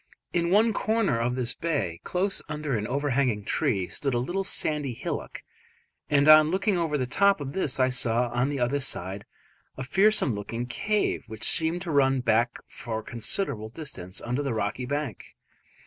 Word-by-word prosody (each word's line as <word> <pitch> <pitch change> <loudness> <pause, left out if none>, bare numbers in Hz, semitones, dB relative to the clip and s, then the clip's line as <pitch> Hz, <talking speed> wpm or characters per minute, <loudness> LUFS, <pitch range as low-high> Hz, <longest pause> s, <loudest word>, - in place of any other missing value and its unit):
In 170 -1 +1
one 215 +4 +4
corner 215 - 0
of 120 +2 -1
this 125 -1 -1
bay, 140 - -3
close 195 +2 -1
under 150 -3 -3
an 105 -1 -2
overhanging 130 -6 0
tree, 95 -4 0
stood 135 -3 -2
a - - +2
little 175 +11 -2
sandy 150 -8 0
hillock, - - -5 0.7
and 145 0 +3
on 155 0 +8
looking 195 +3 +1
over 165 -4 0
the 130 - -1
top 200 +10 +3
of 140 -1 -6
this 150 -9 -1
I 130 0 +3
saw 120 -1 0
on 125 +3 +1
the 145 -2 -3
other 125 +4 0
side 100 -6 -3 0.5
a 130 - -4
fearsome 190 - +3
looking 115 +4 -4
cave 210 - -1
which 110 -1 -8
seemed 165 +2 +4
to 170 - -4
run 135 -2 +3
back 115 0 +1
for 110 -3 -6
a - - -21
considerable 115 - 0
distance 110 - -5
under 125 +4 -2
the 135 -5 -2
rocky 110 +4 -3
bank. 145 -6 -5
135 Hz, 180 wpm, -26 LUFS, 120-160 Hz, 0.7 s, on